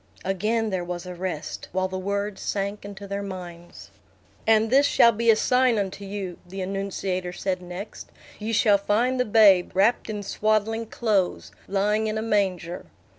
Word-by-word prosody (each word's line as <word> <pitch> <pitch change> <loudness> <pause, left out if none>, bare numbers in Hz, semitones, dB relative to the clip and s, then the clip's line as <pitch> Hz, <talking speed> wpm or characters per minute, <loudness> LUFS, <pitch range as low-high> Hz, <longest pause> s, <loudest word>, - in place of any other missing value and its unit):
Again 215 +4 0
there 185 -2 -1
was 175 0 -5
a 180 - -6
rest, 180 -3 -5
while 185 0 +1
the 185 0 -5
words 200 +1 -3
sank 200 +1 -3
into 200 0 -8
their 200 +1 -3
minds. 175 -3 -9 0.6
"And 220 0 +4
this 280 +2 +5
shall 235 - +6
be 230 +1 0
a 225 - +8
sign 250 +1 +3
unto 200 0 -3
you," 195 -2 -5
the 190 +2 -9
annunciator 190 -1 -3
said 185 0 -2
next. 180 +4 -8 0.3
"Ye 215 +2 -3
shall 210 -2 +4
find 235 +6 +1
the 250 - +2
babe, 205 -5 +5
wrapped 210 +5 +2
in 210 -1 -4
swaddling 215 +2 0
clothes, 185 - 0 0.2
lying 210 +2 +1
in 215 0 -2
a 220 - -2
manger." 190 -6 -1
200 Hz, 170 wpm, -25 LUFS, 185-220 Hz, 0.6 s, a